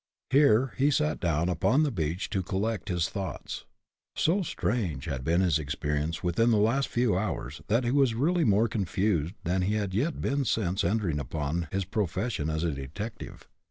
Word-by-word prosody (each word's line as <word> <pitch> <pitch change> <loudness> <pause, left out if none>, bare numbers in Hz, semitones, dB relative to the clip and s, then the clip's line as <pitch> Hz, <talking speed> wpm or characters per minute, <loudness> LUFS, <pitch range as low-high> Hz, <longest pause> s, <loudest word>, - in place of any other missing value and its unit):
Here 135 -3 +4
he 140 +2 +3
sat 75 - +1
down 85 -1 +1
upon 100 - +2
the 150 - +1
beach 85 -3 -2
to 95 - 0
collect 100 +3 -2
his 90 -2 +1
thoughts. 95 -3 -5 0.5
So 180 +6 +2
strange 110 - -2
had 70 -6 -3
been 85 +5 +2
his 85 -5 +2
experience 75 +2 -2
within 90 +7 +2
the 115 - +4
last 115 +6 +2
few 120 -5 +1
hours 80 - -3
that 115 +4 +2
he 120 - 0
was 135 -4 +3
really 165 +8 +2
more 105 0 +4
confused 95 -4 0
than 90 +2 0
he 100 +4 +1
had 100 -3 -2
yet 145 - 0
been 140 0 0
since 95 -6 0
entering 90 -5 0
upon 75 +5 -2
his 95 -1 -1
profession 100 -3 -1
as 80 +1 -1
a 85 - +1
detective. 75 - -7
95 Hz, 180 wpm, -28 LUFS, 80-115 Hz, 0.5 s, Here